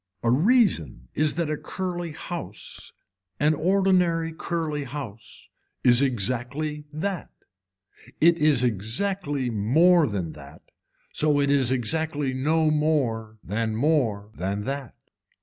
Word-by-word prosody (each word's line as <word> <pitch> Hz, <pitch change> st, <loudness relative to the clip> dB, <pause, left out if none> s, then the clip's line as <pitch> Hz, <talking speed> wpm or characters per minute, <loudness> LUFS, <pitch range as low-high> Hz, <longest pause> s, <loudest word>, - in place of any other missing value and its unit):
A 115 Hz, -, +3 dB
reason 135 Hz, -, +2 dB
is 155 Hz, 0 st, +1 dB
that 165 Hz, -2 st, -1 dB
a -, -, 0 dB
curly 175 Hz, -2 st, -4 dB
house 170 Hz, +3 st, -7 dB, 0.5 s
an 150 Hz, +1 st, +3 dB
ordinary 175 Hz, -1 st, +2 dB
curly 160 Hz, -3 st, -3 dB
house 120 Hz, -5 st, -8 dB, 0.4 s
is 120 Hz, 0 st, +6 dB
exactly 135 Hz, +5 st, -1 dB
that, 175 Hz, +4 st, -3 dB, 0.9 s
it 170 Hz, +1 st, +5 dB
is 150 Hz, -5 st, +4 dB
exactly 130 Hz, -, -1 dB
more 155 Hz, -, +4 dB
than 95 Hz, -7 st, -3 dB
that, 70 Hz, -2 st, -13 dB, 0.5 s
it 145 Hz, -2 st, +2 dB
is 135 Hz, -4 st, +3 dB
so 130 Hz, -, +2 dB
exactly 145 Hz, +2 st, -1 dB
no 155 Hz, +4 st, +2 dB
more 130 Hz, -8 st, 0 dB
than 110 Hz, +3 st, -2 dB
more 115 Hz, -7 st, +1 dB
than 100 Hz, +1 st, -3 dB
that. 135 Hz, 0 st, -5 dB
145 Hz, 115 wpm, -25 LUFS, 115-160 Hz, 0.9 s, is